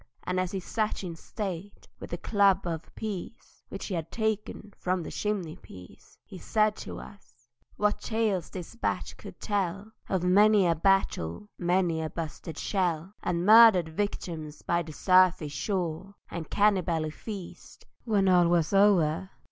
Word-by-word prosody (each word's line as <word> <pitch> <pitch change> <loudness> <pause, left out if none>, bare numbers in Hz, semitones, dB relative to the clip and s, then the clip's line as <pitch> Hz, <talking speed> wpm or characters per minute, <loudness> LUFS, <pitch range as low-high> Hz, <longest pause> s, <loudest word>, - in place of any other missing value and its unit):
And 185 0 -1
as 185 -1 0
he 195 - -2
sat 215 +3 -2
in 170 -3 -5
state, 195 +1 -6
with - - -8
the 175 - -4
club 195 0 +2
of 165 -2 -4
peace 205 -5 -7
Which - - -6
he 200 - -4
had 165 -2 -4
taken 215 -2 -3
from 180 -1 -1
the - - -7
chimney 195 -7 -2
piece, 90 -1 -15
He 185 - -10
said 215 +1 +1
to - - -7
us: 125 -11 -14 0.3
"What 210 0 0
tales 215 -6 -1
this 180 +1 -8
bat 230 - -2
could - - -11
tell 200 0 -2 0.2
Of 185 -2 0
many 205 +2 +5
a 170 - +4
battle—many 170 - 0
a 160 - -3
busted 165 0 -6
shell, 180 -2 -1
And 175 0 -1
murdered 215 -6 +8
victims 160 -4 -4
by 170 0 +1
the 160 -2 -8
surfy 185 -1 +4
shore, 180 +4 -3 0.2
And 170 -2 -6
cani 205 -2 +3
bally 160 -3 -2
feasts 195 +1 -9 0.2
when 205 -4 +2
all 180 -2 +5
was 170 +1 +1
o'er!" 190 -3 +3
185 Hz, 155 wpm, -28 LUFS, 165-205 Hz, 0.3 s, murdered